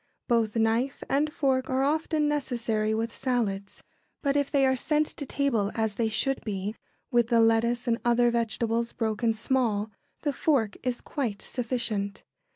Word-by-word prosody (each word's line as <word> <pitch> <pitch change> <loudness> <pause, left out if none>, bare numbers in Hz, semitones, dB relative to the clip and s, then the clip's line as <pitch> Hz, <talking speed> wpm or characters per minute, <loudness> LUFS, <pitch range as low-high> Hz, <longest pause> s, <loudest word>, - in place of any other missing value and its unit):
Both 230 -2 +2
knife 230 +4 +1
and 295 +3 +2
fork 265 -3 0
are 260 +1 +1
often 305 +1 +1
necessary 235 -7 0
with 230 +1 -2
salads, 205 -6 -2 0.4
but 280 -1 +1
if 285 -1 +1
they 275 -2 +3
are 260 0 +3
sent 300 +4 +1
to 285 -2 -6
table 235 -9 0
as 220 -2 0
they 225 +2 0
should 240 +5 0
be, 205 -1 -3 0.4
with 240 -1 +3
the 235 -1 +3
lettuce 230 +2 +3
and 230 0 +2
other 240 0 +4
vegetables 235 0 0
broken 225 0 0
small, 220 -3 0 0.3
the 290 -2 0
fork 255 -9 +1
is 250 -2 -2
quite 230 -8 -3
sufficient. 230 -5 -3
235 Hz, 160 wpm, -27 LUFS, 220-270 Hz, 0.4 s, other